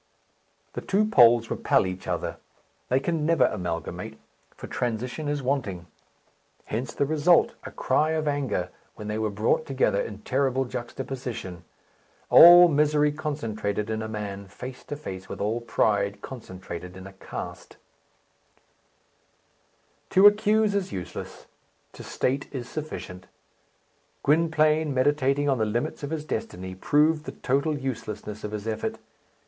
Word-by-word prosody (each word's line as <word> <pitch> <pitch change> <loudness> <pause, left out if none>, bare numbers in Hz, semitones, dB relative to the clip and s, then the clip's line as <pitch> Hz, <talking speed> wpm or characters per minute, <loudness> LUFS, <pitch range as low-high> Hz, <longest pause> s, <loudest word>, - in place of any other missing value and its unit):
The - - -4
two 205 +2 +2
poles 120 - +5
repel - - +2
each 95 0 -6
other. - - -2 0.5
They 130 - +3
can 160 +2 -1
never 155 -5 +4
amalgamate, 90 +2 -4 0.4
for - - -9
transition 125 +5 -3
is 145 -1 -2
wanting. 115 -10 -2 0.8
Hence 115 +3 -3
the 140 - 0
result 155 +4 +3
a - - -5
cry 155 +1 +1
of 155 -1 -1
anger 135 -11 -1 0.2
when 105 - -8
they 105 +1 -2
were 110 -1 0
brought 105 +9 0
together 130 -7 +1
in 105 -1 -7
terrible 135 0 +1
juxtaposition: 120 -7 -6 0.7
all 175 +1 +10
misery 150 -1 +3
concentrated 110 -9 -3
in 110 0 -2
a 110 - -4
man, 100 -2 -5
face 125 +6 -9
to 145 - -5
face 95 -10 -8
with - - -6
all 110 +4 -1
pride 100 -3 0
concentrated 95 -6 -8
in 95 - -10
a 95 - -10
caste. 95 - -8 2.3
To 190 +2 +5
accuse 210 0 +5
is 200 -2 -1
useless. 95 -3 -7 0.5
To - - -11
state 135 +2 -2
is 125 -4 -5
sufficient. 135 -12 -7 1.0
Gwynplaine, 155 -1 +2
meditating 145 +1 +2
on 135 -3 +2
the 110 - +2
limits 115 +3 -2
of 145 - -4
his 155 -1 -4
destiny, 95 -8 -4
proved 150 +10 +2
the - - -6
total 140 +3 +1
uselessness 110 -5 -5
of 105 - -3
his 105 0 -6
effort. 110 -1 -2
125 Hz, 140 wpm, -26 LUFS, 105-150 Hz, 2.3 s, all